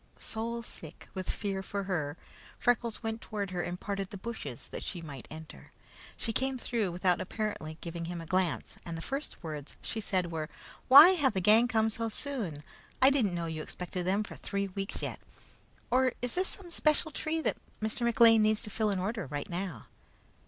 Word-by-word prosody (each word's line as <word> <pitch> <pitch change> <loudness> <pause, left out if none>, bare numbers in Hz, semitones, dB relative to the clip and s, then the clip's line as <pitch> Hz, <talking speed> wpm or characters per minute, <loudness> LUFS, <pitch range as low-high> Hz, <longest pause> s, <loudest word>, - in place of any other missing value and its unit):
Soulsick 225 -7 -4
with 185 -1 -4
fear 195 -2 -1
for 200 +1 -3
her, 160 -6 -2 0.4
Freckles 235 -1 +1
went 225 0 -2
toward 205 -3 -3
her 180 -1 -1
and 175 +1 -3
parted 195 -2 -3
the 200 - -7
bushes 230 +4 -6
that - - -5
she 180 - -4
might 145 -6 -8
enter. 160 0 -10 0.5
She 225 - -2
came 265 +2 0
through 230 -6 -1
without 180 0 +2
apparently 185 -7 -3
giving 170 0 -4
him 175 0 -4
a 165 - -6
glance, 185 -1 0
and 170 -1 -5
the 165 - -5
first 275 -6 -4
words 150 -3 -6
she 225 - -3
said 185 -4 0
were: 155 -1 -3 0.4
"Why 275 +6 +12
have 290 - +3
the 190 - +1
gang 215 +6 +6
come 220 -2 +2
so 230 +1 -2
soon? 215 - -2 0.4
I 265 +1 +7
didn't 225 -10 +2
know 170 -1 -1
you 160 -1 -3
expected 180 +2 -4
them 200 +3 +2
for - - -8
three 200 -1 -2
weeks 195 +1 -4
yet. - - -3 0.7
Or 255 0 +4
is 245 -1 -1
this 370 +1 +2
some 390 - -7
especial 315 -2 +2
tree 315 +2 -1
that - - 0 0.2
Mr. 220 +2 -2
McLean 230 -1 +6
needs 215 0 +3
to 210 - -3
fill 215 +1 +1
an 200 - 0
order 200 - -2
right 145 +5 -4
now?" 175 - -4
200 Hz, 195 wpm, -31 LUFS, 175-235 Hz, 0.7 s, Why